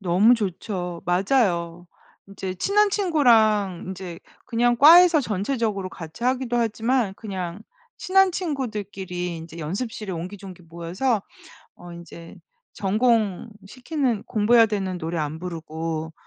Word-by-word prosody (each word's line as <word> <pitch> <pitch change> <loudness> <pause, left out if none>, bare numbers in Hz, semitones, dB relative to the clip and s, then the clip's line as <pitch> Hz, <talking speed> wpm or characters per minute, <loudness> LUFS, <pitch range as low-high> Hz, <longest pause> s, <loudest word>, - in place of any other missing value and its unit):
너무 200 +6 +4
좋죠. 180 -4 -4
맞아요. 175 -3 +1 0.4
인제 190 -1 -6
친한 405 - +2
친구랑 225 - +3
인제 185 -2 -7 0.3
그냥 240 0 +2
과에서 330 +4 +8
전체적으로 210 -3 -2
같이 170 +6 -9
하기도 250 -1 0
하지만 230 -1 0
그냥 190 -2 -6 0.4
친한 385 0 +3
친구들끼리 205 - -4
인제 165 +1 -10
연습실에 200 +5 -4
옹기종기 185 +1 -8
모여서 175 +8 -2 0.5
어 175 - -12
인제 170 -1 -11 0.4
전공시키는 225 - -1
공부 220 +2 +2
해야 230 -1 +8
되는 195 -4 -3
노래 165 +1 -4
안 155 0 -3
부르고 160 -2 -5
200 Hz, 280 characters per minute, -23 LUFS, 175-240 Hz, 0.5 s, 과에서